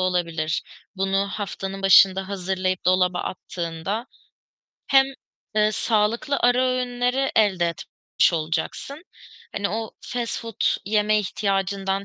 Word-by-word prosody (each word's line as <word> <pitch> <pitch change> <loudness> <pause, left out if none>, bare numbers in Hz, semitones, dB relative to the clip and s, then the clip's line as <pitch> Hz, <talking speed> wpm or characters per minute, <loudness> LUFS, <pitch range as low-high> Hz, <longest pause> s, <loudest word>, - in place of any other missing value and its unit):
olabilir, 170 -3 -1 0.3
bunu 195 +1 0
haftanın 195 -1 -5
başında 190 0 +6
hazırlayıp 185 -1 -2
dolaba 180 -1 +3
attığında 175 +7 -4 0.8
hem, 270 -1 +5 0.5
ııı, 215 0 +3
sağlıklı 230 +7 +1
ara 245 +1 +3
öğünleri 250 +1 0
elde 190 -6 +3
etmiş 170 +2 -1
olacaksın, 165 - -3 0.5
hani, 200 -1 -1
o 225 +1 -3
fast 240 -2 -3
food 230 -2 -9 0.3
yeme 215 +1 +2
ihtiyacından 195 -1 -1
195 Hz, 105 wpm, -23 LUFS, 185-225 Hz, 0.8 s, başında